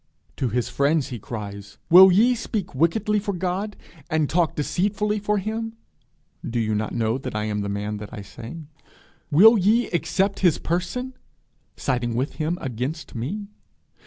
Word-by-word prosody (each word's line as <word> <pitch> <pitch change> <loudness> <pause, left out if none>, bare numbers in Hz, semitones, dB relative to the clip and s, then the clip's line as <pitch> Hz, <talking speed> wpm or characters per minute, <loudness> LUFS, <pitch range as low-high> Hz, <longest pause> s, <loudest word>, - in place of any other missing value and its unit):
_ - - -40
To 130 - 0
his 120 +2 -1
friends 140 +1 +1
he 120 - -6
cries: 100 -2 -7
'Will 190 +2 +10
ye 225 +7 +5
speak 215 -6 -4
wickedly 170 +9 +2
for 200 0 -3
God? 185 +3 -3 0.3
and 155 -2 +1
talk 170 0 +1
deceitfully 210 +7 0
for 210 +1 0
him?' 225 +3 -4 0.7
Do 120 - -2
you 110 -1 0
not 105 +1 -1
know 115 +2 0
that 130 - -6
I 105 - -1
am 105 -1 -2
the 100 - -3
man 105 +1 -3
I 105 -4 -7
say? 120 - -9 0.7
'Will 215 +9 +7
ye 220 +6 +3
accept 195 +3 0
His 175 -5 +4
person?' 185 +10 -2 0.6
_siding 120 -3 -1
with 130 +4 -2
Him 165 +3 0
against 130 +6 -4
me? 165 - -4
165 Hz, 160 wpm, -24 LUFS, -, 0.7 s, Will